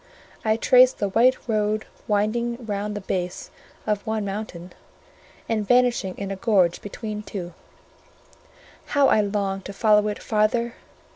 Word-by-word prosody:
I 220 0 +2
traced 255 +2 +5
the 205 - -1
white 245 +6 +4
road 215 -1 0 0.2
winding 235 +3 0
round 210 0 -3
the 205 - -4
base 180 -1 -4 0.3
of 210 -2 -1
one 220 -1 -1
mountain, 195 -3 -6 0.7
and 215 -3 -1
vanishing 245 -6 +2
in 195 -1 -4
a - - -2
gorge 190 -4 +2
between 210 +1 -6
two; 180 -4 -7 1.4
how 280 -1 +6
I 215 - +4
longed 200 -2 -2
to 200 - -6
follow 210 0 +3
it 210 - -2
farther! 230 +2 0
210 Hz, 140 wpm, -24 LUFS, 200-225 Hz, 1.4 s, how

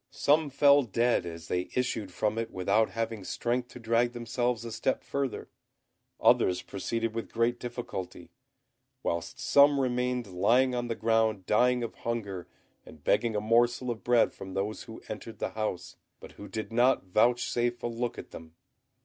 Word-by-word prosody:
Some 150 +1 +2
fell 140 +1 +5
dead 120 -4 +1
as 85 -1 -8
they 90 0 -2
issued 115 -6 -1
from 105 +4 -1
it 115 0 -3
without 100 +3 +1
having 115 -2 -3
strength 120 +5 -2
to 125 - -12
drag 115 +1 +1
themselves 120 0 -2
a 115 - -6
step 130 +4 -1
further; 140 -3 -3 0.7
others 90 0 +3
proceeded 115 +3 -3
with 115 0 -5
great 115 +1 +1
difficulty; 95 -8 -6 0.7
whilst 85 0 -3
some 140 0 +5
remained 125 -1 0
lying 120 +8 +2
on 120 -1 -2
the 115 - -2
ground 110 -3 +1
dying 125 +4 +3
of 115 - -4
hunger 100 -7 -4 0.4
and - - -15
begging 115 -2 +2
a - - +2
morsel 120 +3 +2
of 115 - -7
bread 120 -1 +3
from 95 -1 -9
those 100 +2 -3
who 115 - -11
entered 110 +1 -7
the - - -2
house, 110 -5 -4 0.2
but - - -12
who 105 - -11
did 110 +1 -5
not 120 -2 +3
vouchsafe 120 +4 +1
a - - 0
look 120 +1 -3
at - - -9
them. 80 0 -11
115 Hz, 165 wpm, -29 LUFS, 105-120 Hz, 0.7 s, fell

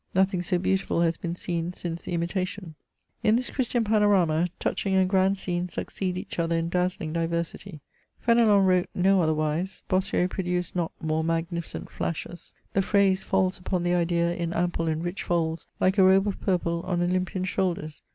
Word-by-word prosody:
Nothing 190 -1 +2
so 180 +1 0
beautiful 190 -1 0
has 165 -1 +2
been 170 -1 -4
seen 175 -1 -3
since 170 -1 -5
the 175 - -3
ImUation. 180 0 -3 0.5
In 215 0 +4
this 250 +1 -1
Christian 245 -3 0
panorama, 200 -6 +3
touching 195 -1 -1
and 190 -1 +4
grand 190 0 +3
sceaes 180 -1 -2
succeed 185 -2 -3
each 185 - -6
other 165 0 +1
in 165 0 -1
dazzling 180 -3 -1
diversity. 170 0 -3 0.4
Fenelon 225 -4 +4
wrote 185 -1 +2
no 190 +1 +4
otherwise; 155 +3 -1
Bossuet 185 -1 +1
produced 180 -1 -2
not 170 -2 -1
more 160 0 -1
magnificent 165 +1 -3
flashes. 170 +1 -5 0.2
The 195 - +3
phrase 195 -1 +3
falls 190 -1 0
upon 180 -1 -2
the 175 0 +1
idea 170 0 +1
in 170 -1 -3
ample 170 -1 0
and 160 +1 -1
rich 175 +2 -3
folds, 165 -2 -1
like 190 +2 +2
a - - +7
robe 190 +1 +5
of 200 - -3
purple 170 -3 0
on 175 -1 0
Olympian 185 +1 -1
shoulders. 170 -5 -2
180 Hz, 170 wpm, -26 LUFS, 170-190 Hz, 0.5 s, a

